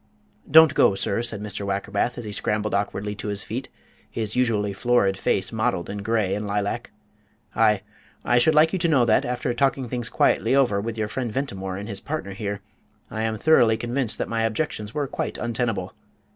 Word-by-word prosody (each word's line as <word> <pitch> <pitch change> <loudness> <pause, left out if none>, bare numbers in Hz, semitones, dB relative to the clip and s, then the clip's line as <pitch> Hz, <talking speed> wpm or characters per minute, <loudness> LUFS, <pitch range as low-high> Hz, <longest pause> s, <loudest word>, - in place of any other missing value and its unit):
"Don't 160 -2 +8
go, 100 - +4
sir," 100 +3 -1
said 115 -3 -4
Mr. 105 -1 -5
Wackerbath, 100 +3 -1
as 120 - -6
he 105 - -5
scrambled 105 +1 -1
awkwardly 100 0 -1
to 105 - -7
his 100 -1 -2
feet, 125 +4 -5 0.4
his 110 -2 -4
usually 110 -5 +1
florid 100 -2 +2
face 95 0 0
mottled 110 -5 -1
in 105 - -5
grey 105 -2 0
and 105 +1 -3
lilac. 105 +4 -2 0.7
"I 105 -3 +3 0.4
I 120 0 +4
should 155 +5 +3
like 160 +3 +5
you 190 - 0
to 170 - +2
know 140 -7 +4
that, 110 - +3
after 125 0 -2
talking 135 0 +1
things 120 -1 -3
quietly 115 +4 +2
over 120 -8 +3
with 115 +1 -4
your 110 -1 -1
friend 120 +2 -3
Mr. - - -8
Ventimore 95 -9 -3
and 100 +1 -6
his 100 -3 -5
partner 145 -8 -4
here, 100 0 -4 0.5
I 110 - -3
am 110 -1 -1
thoroughly 120 -6 +4
convinced 120 +1 -1
that - - -2
my 115 0 -1
objections 110 -2 -2
were 150 -1 0
quite - - -4
untenable. 115 -5 -2
110 Hz, 200 wpm, -24 LUFS, 100-125 Hz, 0.7 s, Don't